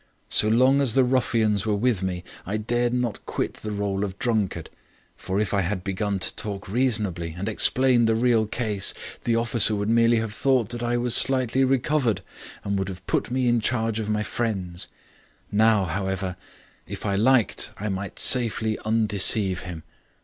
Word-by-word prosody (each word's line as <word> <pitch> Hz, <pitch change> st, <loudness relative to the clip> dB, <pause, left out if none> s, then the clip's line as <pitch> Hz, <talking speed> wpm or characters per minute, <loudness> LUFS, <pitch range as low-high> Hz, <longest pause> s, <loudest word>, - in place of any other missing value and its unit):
So 105 Hz, -, +2 dB
long 130 Hz, +5 st, +4 dB
as 125 Hz, -5 st, +2 dB
the 135 Hz, -, +5 dB
ruffians 115 Hz, -5 st, +1 dB
were 105 Hz, -, +1 dB
with 110 Hz, -2 st, 0 dB
me, 90 Hz, -2 st, -3 dB, 0.2 s
I 100 Hz, +4 st, -3 dB
dared 120 Hz, +3 st, -1 dB
not 125 Hz, -3 st, -2 dB
quit -, -, -3 dB
the 110 Hz, -, -6 dB
role 100 Hz, -1 st, -2 dB
of 100 Hz, -1 st, -5 dB
drunkard. 105 Hz, -9 st, -2 dB, 0.4 s
For 95 Hz, +1 st, -3 dB
if 105 Hz, -1 st, -1 dB
I 100 Hz, -, +2 dB
had 95 Hz, 0 st, -3 dB
begun 100 Hz, +1 st, -2 dB
to 95 Hz, -, -1 dB
talk 100 Hz, -2 st, -5 dB
reasonably 105 Hz, -8 st, -1 dB
and 100 Hz, +3 st, -4 dB
explain 125 Hz, +2 st, +2 dB
the 115 Hz, -, +2 dB
real 115 Hz, -2 st, +2 dB
case, 105 Hz, -4 st, -1 dB, 0.3 s
the 115 Hz, -, +1 dB
officer 115 Hz, -2 st, +4 dB
would 105 Hz, +1 st, -2 dB
merely 115 Hz, 0 st, +3 dB
have 110 Hz, -1 st, -3 dB
thought 130 Hz, -1 st, +1 dB
that 120 Hz, 0 st, -6 dB
I 120 Hz, 0 st, 0 dB
was 120 Hz, -1 st, 0 dB
slightly 130 Hz, 0 st, +4 dB
recovered 130 Hz, -3 st, 0 dB, 0.4 s
and 100 Hz, -1 st, -2 dB
would 95 Hz, 0 st, -3 dB
have 95 Hz, 0 st, -9 dB
put -, -, -1 dB
me 125 Hz, 0 st, 0 dB
in 120 Hz, 0 st, +3 dB
charge 115 Hz, -1 st, -1 dB
of 110 Hz, -1 st, -4 dB
my 105 Hz, 0 st, 0 dB
friends. 95 Hz, -7 st, -3 dB, 0.6 s
Now, 105 Hz, -1 st, +3 dB
however, 95 Hz, +1 st, -3 dB, 0.5 s
if -, -, -7 dB
I 100 Hz, -, 0 dB
liked 115 Hz, +3 st, +2 dB
I 105 Hz, -, -4 dB
might 95 Hz, -1 st, -5 dB
safely 110 Hz, -3 st, +4 dB
undeceive 105 Hz, -3 st, +2 dB
him. 85 Hz, -3 st, -8 dB
110 Hz, 180 wpm, -24 LUFS, 100-120 Hz, 0.6 s, the